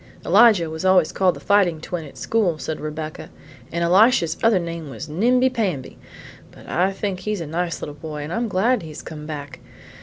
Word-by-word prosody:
"Elijah 200 -2 +5
was 160 +1 -6
always 185 -3 +4
called 185 -2 +2
the - - -9
fighting 195 -6 +2
twin' 165 0 -5
at 140 - -13
school," 205 -8 0
said 155 0 -5
Rebecca, 155 +1 -6 0.4
"and 170 +1 -1
Elisha's 180 -1 +4
other 225 -3 +4
name 170 -3 -4
was 140 - -7
Nimbi 245 +11 +2
Pamby; 190 - -2 0.5
but - - -16
I 185 +2 +1
think 195 -1 -3
he's 210 -2 -3
a 165 - -4
nice 170 +3 -3
little 145 - -5
boy, 150 0 -7
and 150 - -5
I'm 235 +1 -1
glad 220 +6 +1
he 165 - -9
has 155 - -9
come 150 -1 -8
back. 145 -2 -7
170 Hz, 195 wpm, -22 LUFS, 155-205 Hz, 0.5 s, Elijah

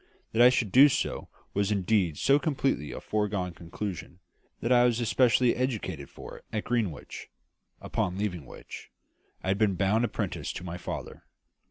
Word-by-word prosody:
That 115 - +2
I 125 - +9
should 115 -5 0
do 140 +6 +8
so - - -2 0.2
was 100 +1 0
indeed 95 -5 +1
so 140 +1 +4
completely 135 - -1
a - - -6
foregone 100 -4 -2
conclusion, 85 0 -6 0.4
that 115 - -2
I 120 -1 +6
was 120 -1 +2
especially 120 +1 +3
educated 105 - -3
for - - -10
it - - -28
at 105 - -2
Greenwich; 110 -10 -3 0.5
upon 90 - -2
leaving 90 -9 -3
which, - - -10 0.5
I 95 - -2
had 95 +1 +1
been 105 -3 +3
bound 100 +5 +2
apprentice 120 - -2
to - - -7
my 90 0 -6
father. - - -6
105 Hz, 165 wpm, -28 LUFS, 90-120 Hz, 0.5 s, I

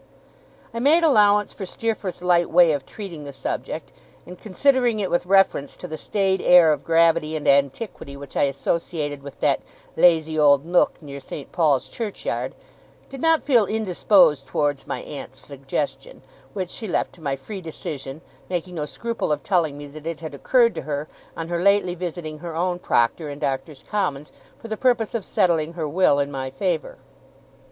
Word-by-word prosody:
I 230 - -3
made 305 +7 +4
allowance 210 -8 +4
for 200 - -7
Steerforth's 210 -4 -3
light 175 -1 +3
way 175 -1 +6
of 145 -3 -3
treating 180 -8 -8
the 140 - -7
subject, - - -5 0.3
and, 180 - -10
considering 240 +3 +1
it 195 -3 -2
with 175 +1 0
reference 195 -7 +2
to 180 - -8
the 160 - -5
staid 190 +4 0
air 175 -3 +7
of - - -5
gravity 165 -1 +3
and 155 - -4
antiquity 140 - 0
which 140 -1 -11
I - - +3
associated 145 +1 -2
with 140 -1 -11
that - - +2 0.3
'lazy 160 -2 +3
old 145 -1 +5
nook 175 -1 +1
near 140 -1 -8
St. 140 +1 -8
Paul's 150 -6 +2
Churchyard', 220 -4 -4 0.6
did 270 -1 -8
not 325 -1 +3
feel 240 -8 +3
indisposed 180 -8 +3
towards 145 0 -1
my - - -3
aunt's - - -8
suggestion; - - -5 0.3
which 185 -3 -4
she 220 - -4
left 180 - -1
to 170 - -17
my 140 -3 -1
free 190 +9 -8
decision, 150 -3 -6 0.3
making 180 0 -3
no 150 -3 -3
scruple 230 +3 -3
of 150 - -1
telling 165 -7 +1
me 145 - -8
that 150 +2 -10
it 165 -2 -4
had 160 -2 -7
occurred 235 - +3
to - - -5
her, 145 +1 -4 0.3
on 165 - -4
her 170 0 -1
lately 200 -2 +3
visiting 170 -3 -6
her 170 -1 -7
own 175 +1 -1
proctor 145 +1 +1
in 145 - -6
Doctors' 140 0 -4
Commons 150 -9 -2 0.3
for - - -10
the 220 -1 -4
purpose 240 -3 +1
of 230 -4 -2
settling 165 -3 +1
her 165 -3 -3
will 155 -1 +3
in 140 0 -1
my 130 -1 -4
favour. 160 +4 -2
170 Hz, 180 wpm, -23 LUFS, 145-200 Hz, 0.6 s, air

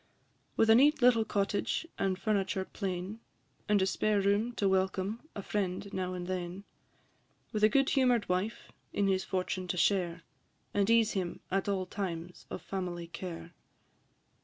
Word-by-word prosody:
With 225 0 +5
a - - +9
neat 275 +3 +5
little 240 -2 +6
cottage 205 +7 -1
and 190 -1 +1
furniture 195 -2 0
plain, 190 +2 -4 0.5
And 210 -1 +4
a - - +3
spare 210 +2 +1
room 205 +4 +2
to 205 -3 +1
welcome 190 +7 0
a 200 - -5
friend 195 0 -2
now 185 -1 -2
and 180 -1 -4
then; 185 +1 -4 0.9
With 210 -1 -2
a 215 - +8
good 275 +4 +3
humour'd 250 -4 +3
wife 185 +5 -2 0.2
in 200 - +1
his 190 -1 +2
fortune 185 0 -2
to 180 - -2
share, 175 -3 +1 0.5
And 200 0 +2
ease 230 -1 +5
him 185 -3 -3
at 195 +1 0
all 190 -2 0
times 180 -3 -5
of - - -6
family 180 -3 -4
care. 170 -1 -7
195 Hz, 160 wpm, -31 LUFS, 185-215 Hz, 0.9 s, a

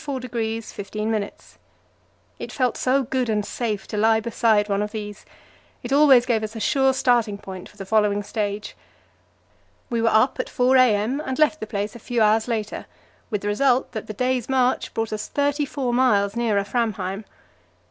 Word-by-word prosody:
It - - -6
felt 255 -4 0
so 265 +2 +1
good 255 -1 -1
and 210 -2 0
safe 215 -4 -3
to 210 - -5
lie 220 +1 +4
beside 220 -2 +2
one 200 -1 0
of 210 0 -3
these; 210 -2 -7 0.6
it 245 +2 -3
always 275 -4 +6
gave 235 -3 +1
us 215 +1 -5
a - - -4
sure 265 +3 +3
starting 240 -5 +1
point 190 -2 -9
for 210 - -21
the 195 - -7
following 205 0 +2
stage. 210 0 -4 1.2
We 235 -1 0
were 230 - +3
up 235 +5 +3
at - - -2
4 255 +1 +2
a.m. 250 +2 +3
and 260 -1 -3
left 310 0 +3
the 215 - -5
place 205 +1 -3
a - - -9
few 240 +1 -2
hours 220 +1 +3
later, 220 -3 -3 0.4
with 210 -4 -2
the 205 - -4
result 250 +4 +2
that 220 -3 -6
the 215 - -5
day's 250 +2 -1
march 255 -1 +1
brought 225 -1 -2
us 215 - -4
thirty 285 +1 0
four 260 -3 -2
miles 210 -5 +2
nearer 220 -4 +1
Framheim. 200 -2 -2
225 Hz, 175 wpm, -23 LUFS, 210-255 Hz, 1.2 s, always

